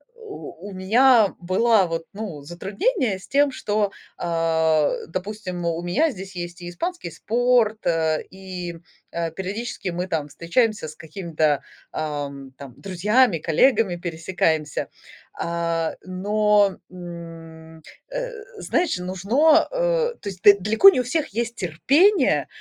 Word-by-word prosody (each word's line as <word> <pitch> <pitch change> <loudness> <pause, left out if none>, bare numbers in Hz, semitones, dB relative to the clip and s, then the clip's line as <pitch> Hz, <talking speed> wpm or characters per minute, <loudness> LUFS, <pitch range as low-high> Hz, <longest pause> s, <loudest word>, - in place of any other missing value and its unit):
у 440 - -10
у - - -9
меня 220 +3 +4
была 190 +3 +3
вот, 165 -1 -4
ну, 200 -9 -6
затруднение 195 - -1
с - - -14
тем, 285 0 +3
что, 205 -4 -1 0.3
а, 160 -2 +1 0.2
допустим, 185 0 -5
у 170 0 -1
меня 280 - +2
здесь 195 -2 -9
есть 175 0 -6
и 175 - -6
испанский 335 - -4
спорт, 225 +4 +1
э, 160 -2 +1
и, 180 -3 -7 0.3
э, 170 -1 -2
периодически 195 +2 -4
мы 175 +2 -3
там 155 -4 -2
встречаемся 200 - 0
с 155 - -10
какими-то, 155 -3 -1 0.3
ам, 140 -3 -5
там 140 -4 -10
друзьями, 200 +2 +2
коллегами 185 - +2
пересекаемся. 165 -3 -1 0.5
А, 170 -1 -1
но, 205 +1 +2
м, 165 -2 -10 0.3
э, - - -4 0.3
знаешь, 345 - 0
нужно, 215 - +3
э, - - +1
то 205 - -5
есть 185 -1 -10
д 200 -1 +8
далеко 220 - +7
не 300 - +1
у - - -4
всех 305 +5 -1
есть 235 +2 -3
терпение, 280 - +3
185 Hz, 130 wpm, -23 LUFS, 165-230 Hz, 0.5 s, д